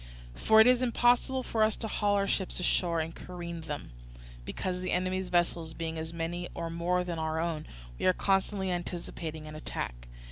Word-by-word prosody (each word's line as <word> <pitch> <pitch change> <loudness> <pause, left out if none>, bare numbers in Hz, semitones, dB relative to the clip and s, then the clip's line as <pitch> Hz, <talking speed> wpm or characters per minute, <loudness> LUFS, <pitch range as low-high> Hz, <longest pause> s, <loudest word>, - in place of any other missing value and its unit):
For 220 - +5
it 220 - +9
is 250 0 +5
impossible 245 +2 +3
for 225 - -1
us 215 0 +4
to 225 - -4
haul 205 -1 +1
our 200 0 +2
ships 190 -2 -1
ashore 170 -2 +1
and 160 +1 -4
careen 170 -2 -6
them, 150 - -6 0.5
because, 180 - -3
the 185 0 -3
enemy's 185 +1 0
vessels 170 -2 +1
being 165 -1 -3
as 160 0 -4
many 170 +1 -3
or 165 -1 -3
more 175 +2 +1
than 175 -2 -3
our 160 0 -1
own, 160 -2 -2 0.3
we - - +2
are 185 - +6
constantly 195 0 +1
anticipating 170 -3 -4
an 155 - -8
attack. - - -5
175 Hz, 185 wpm, -30 LUFS, 165-195 Hz, 0.5 s, it